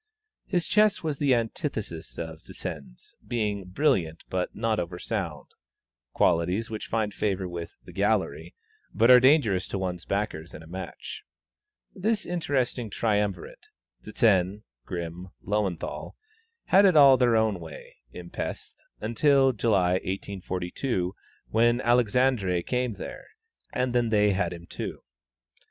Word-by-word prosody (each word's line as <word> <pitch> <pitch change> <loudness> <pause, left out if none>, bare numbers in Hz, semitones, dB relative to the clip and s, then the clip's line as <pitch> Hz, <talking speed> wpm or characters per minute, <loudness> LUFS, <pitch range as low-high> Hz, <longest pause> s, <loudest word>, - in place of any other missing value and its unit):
His 175 -4 0
chess 210 -2 +3
was 150 -3 -2
the 140 -3 +4
antithesis 110 - -4
of 80 -1 -6
Zsen's, - - -8
being 105 -4 -1
"brilliant, 90 - 0
but 90 -1 -2
not 110 -1 0
over 90 0 -4
sound," 90 -7 -4 0.7
qualities 90 - +1
which 110 - -5
find 110 -2 -1
favor 95 -3 -1
with 85 -1 -7
"the - - -11
gallery," 80 +2 0 0.4
but 115 +3 +5
are 125 - +10
dangerous 125 - +4
to - - -3
one's 90 -2 -3
backers 100 -5 -3
in 80 - -10
a - - -14
match. 90 +1 -7 0.7
This 215 +2 -1
interesting 135 -9 -1
triumvirate 105 -4 -1 0.3
Zsen, 105 -2 +2 0.2
Grimm, 85 0 -5 0.2
Löwenthal 100 -4 -2 0.5
had 195 +2 +6
it 185 -5 +5
all 140 -2 +9
their 125 -2 +3
own 110 -4 +2
way, 80 -1 -11
in 85 +3 -10
Pesth, - - -5 0.3
until 135 +4 +3
July, 100 -6 +2
1842, 95 +1 -3 0.4
when 120 +2 +3
Alexandre 120 -6 +2
came 125 +1 -1
there, 270 - -8 0.4
and 125 -1 -1
then 120 -2 +2
they 105 -1 +4
had 100 +1 0
him 85 -1 -8
too. - - -6
105 Hz, 130 wpm, -27 LUFS, 90-125 Hz, 0.7 s, are